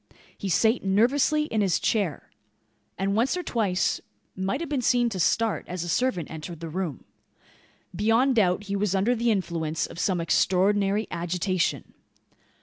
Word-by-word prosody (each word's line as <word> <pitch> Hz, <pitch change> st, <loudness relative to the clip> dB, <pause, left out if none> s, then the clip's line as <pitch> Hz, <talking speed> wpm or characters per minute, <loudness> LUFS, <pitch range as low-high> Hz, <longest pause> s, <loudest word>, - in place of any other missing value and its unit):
He 195 Hz, -, -5 dB
sate 225 Hz, +6 st, +2 dB
nervously 255 Hz, +10 st, +2 dB
in 225 Hz, -8 st, -1 dB
his 190 Hz, -4 st, +2 dB
chair; 200 Hz, -, -1 dB, 0.7 s
and 195 Hz, +1 st, 0 dB
once 250 Hz, +10 st, +1 dB
or 360 Hz, -, -3 dB
twice 195 Hz, -, 0 dB, 0.3 s
might 190 Hz, +6 st, -2 dB
have 335 Hz, -, -4 dB
been 285 Hz, -4 st, -1 dB
seen 240 Hz, 0 st, +2 dB
to 195 Hz, -4 st, -5 dB
start, 220 Hz, +5 st, +1 dB
as 180 Hz, -1 st, -4 dB
a -, -, -5 dB
servant 180 Hz, -, 0 dB
entered 160 Hz, +1 st, -7 dB
the 165 Hz, 0 st, -6 dB
room. 165 Hz, -4 st, -4 dB, 0.9 s
Beyond 225 Hz, +7 st, +3 dB
doubt 190 Hz, -1 st, +2 dB
he 200 Hz, -1 st, -3 dB
was 200 Hz, -1 st, 0 dB
under 200 Hz, +6 st, +2 dB
the 235 Hz, +1 st, 0 dB
influence 165 Hz, -6 st, -1 dB
of -, -, -10 dB
some 185 Hz, -3 st, +1 dB
extraordinary 195 Hz, +5 st, +2 dB
agitation. 180 Hz, +1 st, -1 dB
195 Hz, 155 wpm, -26 LUFS, 180-230 Hz, 0.9 s, Beyond